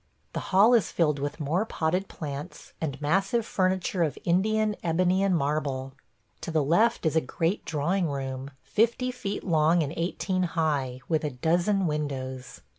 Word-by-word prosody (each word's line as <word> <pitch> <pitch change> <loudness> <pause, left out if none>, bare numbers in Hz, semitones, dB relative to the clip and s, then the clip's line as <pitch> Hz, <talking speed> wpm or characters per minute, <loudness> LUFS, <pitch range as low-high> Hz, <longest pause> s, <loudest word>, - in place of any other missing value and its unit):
The - - -2
hall 205 +5 +6
is 225 -7 +3
filled 150 -4 +1
with 145 +3 -4
more 160 +7 0
potted 180 -2 -1
plants, 145 +2 -7
and 150 -4 -3
massive 195 +8 +1
furniture 185 -1 0
of 155 -6 0
Indian 215 +4 +2
ebony 180 +3 +2
and 195 -3 +3
marble. 140 -3 -2 0.5
To - - -5
the 160 -2 +2
left 215 +9 +2
is 160 - +1
a 160 - +4
great 165 +8 -1
drawing 165 +3 0
room, 135 -1 -4
fifty 235 +3 +1
feet 205 -5 -4
long 160 0 +3
and 145 +1 -4
eighteen 185 +2 -1 0.2
high, 140 -5 0
with 160 -2 +1
a 150 - 0
dozen 175 +9 +1
windows. 130 -5 -4
165 Hz, 160 wpm, -27 LUFS, 145-190 Hz, 0.5 s, hall